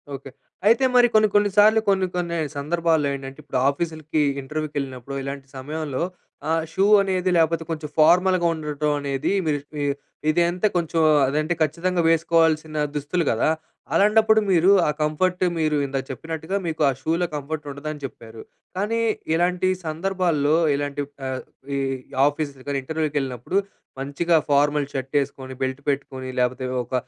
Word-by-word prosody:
Okay. 135 0 -9 0.4
అయితే 230 +4 +5
మరి 245 -1 +7
కొన్ని, 215 0 +5
కొన్ని 205 0 +4
సార్లు 215 +2 +7
కొన్ని, 190 -1 +3
కొన్ని 170 -1 -2 0.2
సందర్భాల్లో 160 0 +1
ఏంటంటే 135 +1 -7
ఇప్పుడు 135 -3 -2
ఆఫీసులకి, 155 0 -2 0.2
ఇంటర్వ్యూకి 150 +2 -5
వెళ్ళినప్పుడు 135 0 -6
ఇలాంటి 140 0 -6
సమయంలో 150 +1 -3 0.5
ఆహ్, 165 0 +2
షూ 195 - +2 0.2
అనేది 185 -1 0
లేకపోతే 165 0 +2
కొంచెం 155 -2 -4
ఫార్మల్‌గా 180 +2 +4
ఉండటం 150 -1 -2
అనేది 140 +2 -2
మీరు 145 -2 +1 0.2
ఇ - - 0 0.5
ఇదంతా 175 +5 +2
కొంచెం 165 -1 0 0.3
అదంటే 155 +5 0
ఖచ్చితంగా 170 +4 +1
వేసుకోవాల్సిన 160 -2 +2 0.2
దుస్తులు 150 +4 -1
కదా! 115 +7 +1 0.4
అలాంటప్పుడు 220 +1 +5
మీరు 180 +2 +5 0.2
ఆ - - +2
కంఫర్ట్ 180 +5 +1 0.2
మీరు 155 -1 +1
ఇందాక 135 -1 -3
చెప్పినట్టుగా 160 +7 -4
మీకు 160 -1 -3
ఆ - - +2
షూలో 165 +4 0
కంఫర్ట్ 150 +1 -5
ఉండదని 150 +1 -6
చెప్పారు. 115 -3 -10 0.4
కానీ 215 +4 0 0.3
ఇలాంటి 180 +2 +1 0.2
సందర్భాల్లో, 165 -3 0 0.2
ఇలాంటి 145 0 -2 0.2
ఆహ్, 130 0 -3 0.4
ఈ - - 0 0.5
ఆఫీస్, 145 0 -2 0.3
ఇంటర్వ్యూకి 155 +1 -3
వెళ్ళినప్పుడు 130 - -3 0.4
మంచిగా 145 +5 0 0.2
ఫార్మల్ 145 0 +3
షర్ట్ 135 -1 -4
వేసుకొని, 135 -1 -3
బెల్ట్ 130 +1 -2
పెట్టుకొని, 130 -2 -3
లేకపోతే 125 +1 0 0.2
ఒక 125 - -14
155 Hz, 140 wpm, -23 LUFS, 140-175 Hz, 0.5 s, మరి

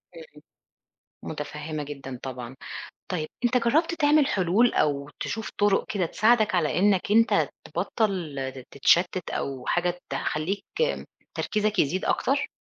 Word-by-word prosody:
إمم. - - -13 0.9
متفهمة 150 0 -5
جدًا 135 -3 -7
طبعًا. 125 -1 -6 0.5
طيّب 160 -4 -2 0.2
أنت 245 +1 +3
جرّبت 295 +9 +2
تعمل 295 -2 +4
حلول، 200 +5 +3
أو 145 -1 +1
تشوف 220 -1 -3
طرق 205 -1 +3
كده 190 -5 0
تساعدك 215 +1 +3
على 160 -3 +1
إنّك 195 0 +3
أنت 230 +1 +4 0.2
تبطل 160 - -2 0.2
تتشتت 175 +5 +2
أو 135 -2 -4
حاجة 175 0 0
تخلّيك 185 +7 -2 0.7
تركيزك 210 0 -1
يزيد 180 +6 +1
أكتر؟ 280 +2 +1
185 Hz, 120 wpm, -26 LUFS, 150-220 Hz, 0.9 s, تعمل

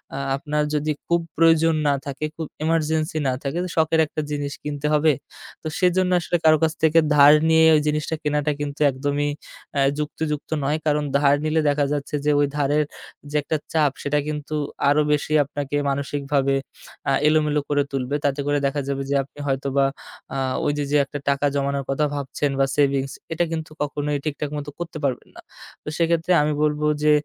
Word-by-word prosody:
আ - - -4 0.2
আপনার 150 +1 -1
যদি 150 +1 0 0.2
খুব 170 0 +3 0.2
প্রয়োজন 165 0 +4
না 145 - +4
থাকে, 140 +2 -4
খুব 165 - -4 0.2
ইমারজেন্সি 160 0 0
না 130 - 0
থাকে, 140 +5 -1 0.2
শখের 160 0 +2
একটা 155 - -4
জিনিস 145 -1 -3
কিনতে 150 0 -3
হবে, 150 0 +4 0.5
তো - - -5
সেজন্য 180 0 +2
আসলে 175 0 0
কারো 155 0 +7
কাছ 160 0 +2
থেকে 160 +1 +5 0.2
ধার 145 0 +8 0.2
নিয়ে 160 0 +6
ওই 150 - +3
জিনিসটা 150 +1 -1
কেনাটা 150 0 0
কিন্তু 145 0 -4
একদমই 145 +2 -1 0.4
অ্যা 140 - +1 0.2
যুক্তিযুক্ত 150 0 -3
নয়। 145 +3 +1
কারণ 150 -1 +2
ধার 140 0 +4
নিলে 155 +1 +2
দেখা 145 0 +1
যাচ্ছে 145 0 -3
যে 150 - +4
ওই 145 - +4
ধারের 145 +1 +2 0.5
যে - - -5
একটা 155 - -1 0.2
চাপ 150 -3 +3
সেটা 145 +1 0
কিন্তু 150 0 -4 0.3
আরও 145 +1 +4
বেশি 150 +1 0
আপনাকে 145 0 -5
মানসিকভাবে 140 0 0 0.5
আ - - +3 0.2
এলোমেলো 150 -1 +2
করে 145 -1 +2
তুলবে। 135 0 -2
তাতে 140 0 +1
করে 145 0 +2
দেখা 140 +1 0
যাবে 140 0 -2
যে 140 - +1
আপনি 140 - -17
হয়তোবা 135 0 +1 0.5
আ - - -1 0.3
ওইযে, 145 0 0
যে 150 - +4
একটা 145 +2 -6
টাকা 140 +1 +1
জমানোর 140 0 -1
কথা 135 +2 +1
ভাবছেন 140 0 -2
বা 135 - +4
সেভিংস 140 -2 +1 0.2
এটা 170 +2 +1
কিন্তু 160 -1 -4
কখনোই 145 0 -1
ঠিকঠাক 150 -1 -3
মতো 145 0 -5
করতে 170 -2 -5
পারবেন 135 -3 -2
না। - - -11 0.4
তো - - -19
সেক্ষেত্রে 170 +1 +1
আমি 150 0 +1
বলব 150 0 0 0.2
যে 150 - +5
150 Hz, 185 wpm, -23 LUFS, 140-155 Hz, 0.5 s, ধার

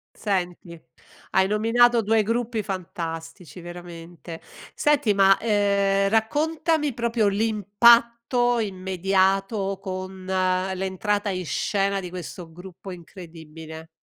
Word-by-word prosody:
Senti, 180 -4 -3 0.5
hai 190 0 +3
nominato 230 +3 +3
2 220 +1 +2
gruppi 230 +1 -2
fantastici 170 -2 -6
veramente. 170 -1 -10 0.3
Senti, 285 -9 +2
ma, 195 0 +5
ehm, 200 -2 +1
raccontami 295 +7 0
proprio 235 -2 0
l'impatto 235 +4 +3
immediato 195 0 0
con 185 -1 -6
l'entrata 190 +2 -1
in 185 -2 -4
scena 195 +3 0
di 180 -2 -7
questo 175 -1 -8
gruppo 180 +3 -11
incredibile. 160 -3 -11
195 Hz, 95 wpm, -24 LUFS, 180-220 Hz, 0.5 s, ma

